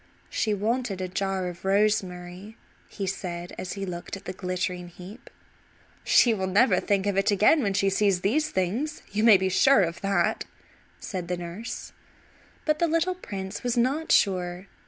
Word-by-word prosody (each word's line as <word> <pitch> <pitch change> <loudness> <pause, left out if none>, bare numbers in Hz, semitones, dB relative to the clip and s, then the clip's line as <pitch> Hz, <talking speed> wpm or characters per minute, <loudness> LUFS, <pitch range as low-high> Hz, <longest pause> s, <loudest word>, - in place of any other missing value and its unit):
"She 215 -2 0
wanted 220 0 -1
a 185 - -2
jar 190 0 -2
of 175 -1 -8
rosemary," 195 0 -1 0.3
he 200 - -5
said 180 -2 -5
as 185 - -4
he 195 -1 -4
looked 175 +1 -6
at 195 - -15
the 185 - -5
glittering 180 -1 -3
heap. 180 +6 -12 0.7
"She 235 - +5
will 190 -3 -2
never 205 +8 +4
think 200 -2 0
of 200 -1 0
it 195 - +1
again 210 +10 +4
when 200 -5 0
she 195 0 +2
sees 195 -2 +2
these 295 +11 +1
things. 225 - -2
You 210 +2 0
may 225 -4 +8
be 190 0 0
sure 200 +4 +5
of 170 0 -3
that," 195 -4 0 0.5
said 185 -4 -5
the 180 0 -2
nurse. 175 +7 -7 0.7
But 305 -1 +1
the 340 - +3
little 330 +3 +1
prince 195 - -6
was 245 -1 -1
not 275 +7 +1
sure. 180 -1 +2
195 Hz, 175 wpm, -26 LUFS, 180-220 Hz, 0.7 s, may